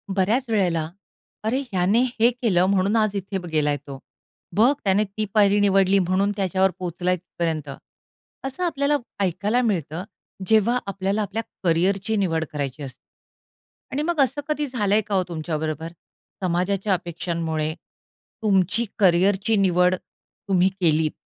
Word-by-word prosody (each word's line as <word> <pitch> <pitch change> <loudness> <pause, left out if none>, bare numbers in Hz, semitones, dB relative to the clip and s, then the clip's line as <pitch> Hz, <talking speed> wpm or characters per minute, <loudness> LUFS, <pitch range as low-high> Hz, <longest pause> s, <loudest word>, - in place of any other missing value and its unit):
बऱ्याच 225 +7 +1
वेळेला 175 -7 +1 0.5
"अरे, 240 +5 0
ह्याने 190 +5 +2 0.2
हे 230 +2 +6
केलं, 215 -8 +1
म्हणून 195 +2 +2
आज 215 -2 +2
इथे 195 0 -3
बघ 180 -2 -7
गेलाय 150 -2 +1
तो. 135 -1 -7 0.6
बघ 230 +6 +5
त्याने 200 +1 +3
ती 215 +1 -4
पायरी 205 -1 +4
निवडली 195 -1 +4
म्हणून 190 +2 +1
त्याच्यावर 190 -1 +2
पोहोचलाय 180 0 -1
तिथपर्यंत." 165 -4 -4 0.8
असं 270 +7 -4
आपल्याला 290 -3 +1 0.3
ऐकायला 200 +7 +1
मिळतं. 180 - -1 0.4
जेव्हा 220 +3 +3
आपल्याला 195 +1 -1
आपल्या 210 +2 -3 0.2
करियरची 190 +5 +1
निवड 165 -5 0
करायची 145 -1 -4
असते. 130 -2 -9 0.9
आणि 280 - -1
मग 340 -1 -1
असं 275 +2 +1
कधी 300 -1 -1
झालंय 215 -5 +1
का 205 -1 -3
हो 185 - +3
तुमच्याबरोबर, 160 0 -3 0.5
समाजाच्या 185 +3 0
अपेक्षांमुळे 165 -3 -2 0.7
तुमची 200 +2 +2
करियरची 195 +3 +3
निवड 180 -1 +3 0.5
तुम्ही 185 -1 +4
केलीत? 155 -2 +2
190 Hz, 135 wpm, -23 LUFS, 170-215 Hz, 0.9 s, हे